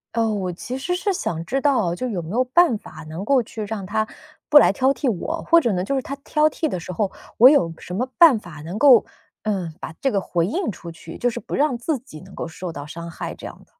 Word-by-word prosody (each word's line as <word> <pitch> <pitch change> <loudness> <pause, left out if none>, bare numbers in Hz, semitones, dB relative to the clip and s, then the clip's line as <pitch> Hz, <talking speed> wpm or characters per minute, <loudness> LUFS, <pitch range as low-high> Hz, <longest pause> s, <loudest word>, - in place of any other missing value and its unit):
呃， 225 -1 +2
我 190 -4 -2
其 245 +9 -6
实 355 +7 -2
是 390 +2 0
想 165 - -3
知 270 +7 -1
道， 225 - +2
就 255 +6 -3
有 185 -6 -2
没 160 +3 -8
有 250 +3 +2
办 255 -2 +3
法 - - -12
能 165 +5 -6
够 270 +1 +3
去 220 -1 -7
让 205 -2 -5
他 220 +3 0 0.4
不 295 - +8
来 - - +5
挑 265 +4 +2
剔 275 -3 -1
我， 315 - -3
或 335 0 +5
者 235 - +1
呢， 180 -1 -1
就 275 - -1
是 265 - 0
他 275 - -6
挑 300 +2 +2
剔 315 +2 -2
的 185 - -3
时 185 - -7
候， 195 +2 -1 0.3
我 250 +4 +9
有 170 - +3
什 180 - -9
么 250 +5 0
办 320 -9 +8
法 175 -7 -10
能 175 +6 -6
够， 260 -1 +7 0.4
嗯， 190 -7 -2
把 160 - -7
这 270 - +1
个 200 - +1
回 170 -3 -1
应 345 - -2
出 170 -4 -7
去， 165 0 -11
就 245 - +1
是 - - -5
不 - - -6
让 280 -4 +1
自 280 +4 -1
己 190 - -12
能 190 +1 -14
够 - - -4
受 165 +1 -7
到 145 0 -7
伤 170 +2 -8
害， - - -6
这 - - -11
样 - - -10
的。 - - -24
220 Hz, 285 characters per minute, -22 LUFS, 180-275 Hz, 0.4 s, 我